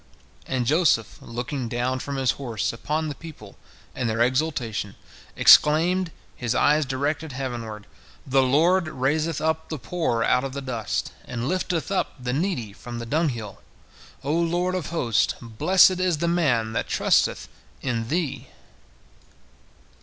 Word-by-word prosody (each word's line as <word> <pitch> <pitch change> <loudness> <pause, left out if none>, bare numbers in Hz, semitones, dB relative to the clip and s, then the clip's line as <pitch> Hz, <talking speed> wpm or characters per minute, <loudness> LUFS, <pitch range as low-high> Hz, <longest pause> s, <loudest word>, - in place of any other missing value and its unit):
And 130 -2 -1
Joseph, 145 - +2
looking 120 +1 -4
down 125 +2 -1
from 140 +2 -5
his 135 -2 +2
horse 120 -7 -3
upon 155 +7 -2
the 150 - -3
people 135 -10 -12 0.4
and 120 - -2
their 115 +1 +2
exultation, 125 -6 -1 0.4
exclaimed, 170 +4 +6 0.3
his 120 -1 -2
eyes 150 0 +3
directed 145 +3 -2
heavenward: 115 -5 -5 0.4
"The 135 0 +3
Lord 165 +7 +3
raiseth 155 +3 0
up 160 0 -1
the 155 - -3
poor 125 -5 -1
out 125 +2 +2
of 135 -1 -4
the 140 - -4
dust, 120 -5 -3
and 120 0 -4
lifteth 180 0 -1
up 195 - -1
the 125 0 -3
needy 135 - -2
from 120 +3 -8
the 115 - -5
dunghill. 120 -6 -2 0.6
O 145 +2 -1
Lord 175 +2 +1
of 185 -4 -2
hosts, 125 - +1
blessed 180 - +4
is 180 -3 +1
the 170 - -1
man 130 -11 +1
that - - -2
trusteth - - +2 0.4
in 115 -4 -1
Thee." 160 0 -2
135 Hz, 145 wpm, -24 LUFS, 120-160 Hz, 0.6 s, exclaimed